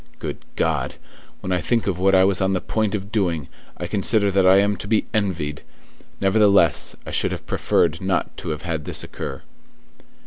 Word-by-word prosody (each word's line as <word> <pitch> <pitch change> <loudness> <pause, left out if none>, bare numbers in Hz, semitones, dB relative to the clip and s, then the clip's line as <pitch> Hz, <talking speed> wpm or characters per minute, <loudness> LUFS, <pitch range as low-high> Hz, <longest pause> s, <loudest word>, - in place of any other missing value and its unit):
Good 75 -9 -5 0.2
God! - - -1 0.5
When 95 - -4
I 90 -1 +1
think 115 +3 0
of 95 -3 -1
what 95 +1 +4
I 95 - +6
was 95 -1 +2
on 95 0 +2
the 95 - +1
point 110 +2 -1
of 100 0 -6
doing, 85 - 0 0.3
I - - -4
consider 100 0 +2
that 95 -1 +3
I 95 +1 +7
am 100 +1 +3
to 100 - -7
be 110 0 +2
envied. 85 -9 -1 0.6
Nevertheless, 100 -4 +3
I - - -6
should - - +1
have - - -5
preferred 80 -1 +1
not 95 0 -1
to - - -6
have 75 -1 -4
had 80 -3 -3
this - - -1
occur." - - -7
95 Hz, 195 wpm, -22 LUFS, 85-100 Hz, 0.6 s, I